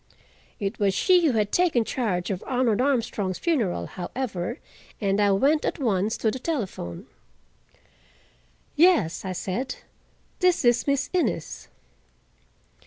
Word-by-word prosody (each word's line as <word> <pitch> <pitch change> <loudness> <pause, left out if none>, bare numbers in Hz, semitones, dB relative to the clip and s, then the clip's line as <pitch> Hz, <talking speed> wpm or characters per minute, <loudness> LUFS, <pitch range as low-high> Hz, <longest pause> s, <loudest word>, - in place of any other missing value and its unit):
It 200 +3 -3
was 200 -2 +2
she 360 - +4
who 275 - +2
had 210 -2 0
taken 330 -11 +2
charge 205 -9 -2
of 185 - -4
Arnold 245 -3 +1
Armstrong's 225 -8 0
funeral, 225 - 0
however, 200 - -4 0.4
and 200 -1 +1
I 205 - +4
went 275 +11 +3
at - - -1
once 215 -5 0
to 220 - +1
the 260 - -5
telephone. 205 - -4 1.7
"Yes," 320 - +3
I 190 -1 -3
said, 190 +8 -3 0.6
"this 360 -7 +2
is 240 +2 +3
Miss 280 -1 0
Innes." 365 - -2
230 Hz, 125 wpm, -25 LUFS, 195-280 Hz, 1.7 s, she